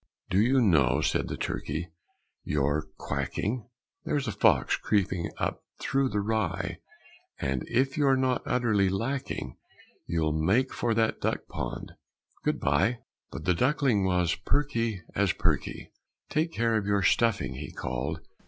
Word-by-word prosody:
"Do 95 - +4
you 130 +5 +4
know," 75 - +4
said 75 - +1
the - - -4
turkey, 80 +4 -3 0.5
"you're 75 +1 0
quacking! 120 +3 -3 0.3
There's 145 -4 -1
a - - 0
fox 100 - +3
creeping 95 -4 0
up - - -2 0.2
thro' 135 0 +1
the 105 -3 -1
rye; 110 0 -1 0.6
And, 65 -1 -1
if 130 +3 +1
you're 140 -3 +4
not 130 -1 +1
utterly 110 -6 +2
lacking, 125 +8 -3 0.5
You'll 80 -2 +1
make 95 +13 +2
for 115 -2 0
that 115 0 +1
duck - - -1
pond. - - -5 0.5
Good - - 0
bye!" 75 - +2 0.3
But 70 +4 -7
the 90 - +4
duckling 125 - +2
was 90 -2 +2
perky 115 -3 0
as - - +2
perky. - - -1 0.4
"Take 160 +2 0
care 115 -4 +1
of 105 -2 -2
your 100 -1 +2
stuffing!" 115 +2 +2
he - - -7
called. 65 +6 -3
105 Hz, 145 wpm, -28 LUFS, 85-125 Hz, 0.6 s, Do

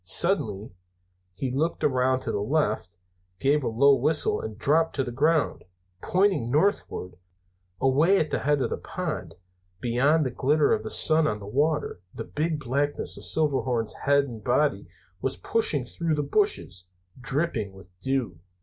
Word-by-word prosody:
Suddenly 110 - +1 0.6
he 125 +8 -4
looked 155 +6 -1
around 130 -1 +2
to - - -3
the - - -1
left, 105 - -1 0.4
gave 145 +4 +2
a - - -1
low 140 +5 +5
whistle 150 +4 +1
and 110 -1 -7
dropped 160 +7 +2
to 135 - 0
the 125 - -5
ground, 150 +4 +1 0.4
pointing 185 - +1
northward. 145 - 0 0.6
Away 150 +9 +4
at 155 -4 0
the - - 0
head 145 0 +1
of - - -2
the - - -1
pond, 80 - -5 0.4
beyond 135 +8 +2
the 130 - -2
glitter 145 +4 +2
of - - 0
the 110 - -6
sun 155 -1 +3
on 105 - -1
the 100 - -10
water, 145 - -1
the - - -4
big 155 0 -2
blackness 145 +2 -1
of - - -7
Silverhorns' 130 -7 0
head 140 +1 +4
and 115 -6 -8
body 125 -6 +1 0.3
was 135 0 -2
pushing 155 - +1
through 165 +4 -2
the 150 - -1
bushes, 145 - -1 0.3
dripping 130 - -2
with 95 -1 -15
dew. 130 -9 -2
135 Hz, 160 wpm, -26 LUFS, 115-155 Hz, 0.6 s, low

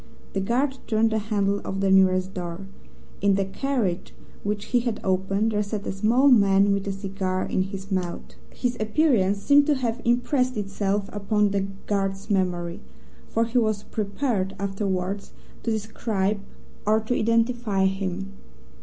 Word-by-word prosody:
The 195 - 0
guard 260 +6 0
turned 225 0 +2
the 220 - +1
handle 205 -2 0
of 195 - -4
the 195 0 +2
nearest 190 0 +4
door. 175 +1 -5 0.6
In 200 -1 +4
the 195 0 +1
carriage 215 -4 -2 0.3
which 205 0 -2
he 245 - +6
had 235 -3 -2
opened, 195 +3 +1
there 210 -1 +1
sat 205 0 -4
a - - -2
small 225 +8 +3
man 200 -4 +5
with 200 0 -2
a - - 0
cigar 190 -1 -2
in - - 0
his 195 +1 -5
mouth. 180 -2 -3 0.2
His 245 -1 -2
appearance 215 -4 +2
seems 285 0 +5
to 300 - +4
have 245 -2 -2
impressed 250 +1 +1
itself 200 0 -1
upon 205 0 +1
the 195 -1 0 0.2
guard's 195 0 -1
memory, 175 -3 0 0.5
for 230 +1 +1
he 235 +2 +1
was 215 -3 0
prepared, 205 -2 -2
afterwards, 195 -1 -2 0.3
to - - -2
describe 215 -2 -1 0.5
or 215 +1 +4
to 220 +3 -1
identify 230 -3 +1
him. 195 0 -2
200 Hz, 155 wpm, -25 LUFS, 195-225 Hz, 0.6 s, he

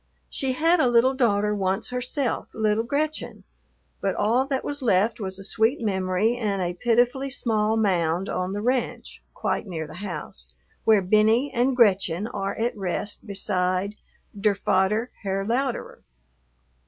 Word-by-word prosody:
She 265 -1 0
had 330 +6 +3
a 265 - +4
little 240 +2 +4
daughter 210 -5 +2
once 195 +3 -1
herself, 250 +1 -2
little 220 0 +1
Gretchen, 300 +5 -3 0.6
but - - 0
all 245 +5 +2
that 270 -2 -1
was 290 0 -4
left 220 -2 +2
was 190 -2 -4
a 195 - -9
sweet 225 +6 +1
memory 190 +1 0
and 205 -4 -1
a 175 -1 -1
pitifully 245 +7 +1
small 220 -4 0
mound 180 -3 +1
on 185 +1 -2
the 205 +1 -3
ranch, 250 0 -2
quite - - -2
near 165 -4 -4
the 155 - -11
house, 65 - -7 0.3
where 215 -3 +5
Benny 220 +8 +3
and 250 +2 +2
Gretchen 200 -5 +3
are 195 -3 -3
at 235 +2 -1
rest 205 +2 -3
beside 190 -1 -1 0.4
"der 205 0 +2
fader, 200 +5 +1
Herr 195 -1 -2
Louderer." 245 +3 -2
215 Hz, 150 wpm, -25 LUFS, 190-245 Hz, 0.6 s, where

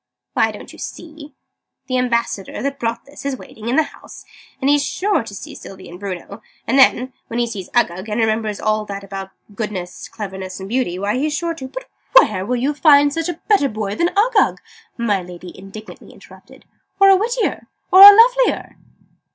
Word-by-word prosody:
"Why, - - +2
don't - - -11
you - - -14
see? 305 -3 -10 0.5
The 255 -1 -1
Ambassador, 235 -6 -2
that 280 0 -3
brought 230 0 -3
this, 285 +1 -13
is 280 -2 -3
waiting 225 -1 -9
in 250 - 0
the 315 - +4
house: - - -13 0.3
and 265 - -1
he's 290 0 +3
sure 400 +6 0
to 225 -3 -9
see - - -9
Sylvie 190 -1 -11
and 175 +1 -11
Bruno: 200 +1 -7 0.2
and 265 +4 +2
then, 255 -1 +4
when 230 - -5
he 240 - +1
sees 205 -6 -7
Uggug, 210 -4 0
and 210 +2 -2
remembers 220 -2 -1
all 215 0 0
that 200 -1 -7
about 195 -1 -7 0.2
'goodness, 195 -5 -6
cleverness, 190 -4 -7
and 190 - -7
beauty,' 225 -6 -1
why, 205 +5 -1
he's 295 +3 -1
sure 340 -1 -2
to 280 -5 -8 0.3
" - - +4
"And - - +3
where 185 -3 -3
will 250 - 0
you 265 +5 0
find 285 -1 +4
a 330 +1 -3
better 395 -10 +3
boy 215 -2 -4
than 340 +11 +1
Uggug?" 440 +1 +3 0.4
my 210 -5 0
Lady 180 0 -11
indignantly 195 +3 -12
interrupted. - - -17 0.3
"Or 390 0 +7
a 390 - +7
wittier, 465 +4 -2 0.2
or 375 - +8
a 405 +1 +14
lovelier?" - - +3
235 Hz, 190 wpm, -19 LUFS, 200-290 Hz, 0.5 s, a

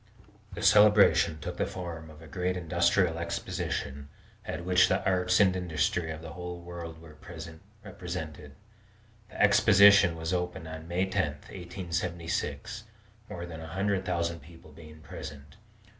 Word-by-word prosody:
The 105 - -5
celebration 105 -6 +6
took 75 - -6
the - - 0
form 85 -3 -7
of 75 +1 -14
a - - -12
great 90 +4 -2
industrial 85 0 +2
exposition, 70 -4 -4 0.3
at 85 +2 -5
which 90 0 +5
the 95 - 0
arts 90 -1 +2
and 95 -2 +5
industries 85 -1 -1
of 80 0 -7
the 80 - -8
whole 90 0 -6
world 85 -2 -8
were 80 -2 -14 0.7
represented. 80 -6 -7 0.7
The - - -11
exposition 100 -3 +6
was 80 +2 -3
opened 90 -2 -3
on 80 0 -8
May 90 +2 0
10, 95 0 0 0.3
1876, 85 +3 -4 0.4
more 85 0 -6
than 80 -2 -8
a 80 - -8
hundred 95 +3 -1
thousand 85 -2 -1
people 80 0 -15
being 75 0 -13
present. 70 +2 -10
85 Hz, 145 wpm, -29 LUFS, 80-95 Hz, 0.7 s, celebration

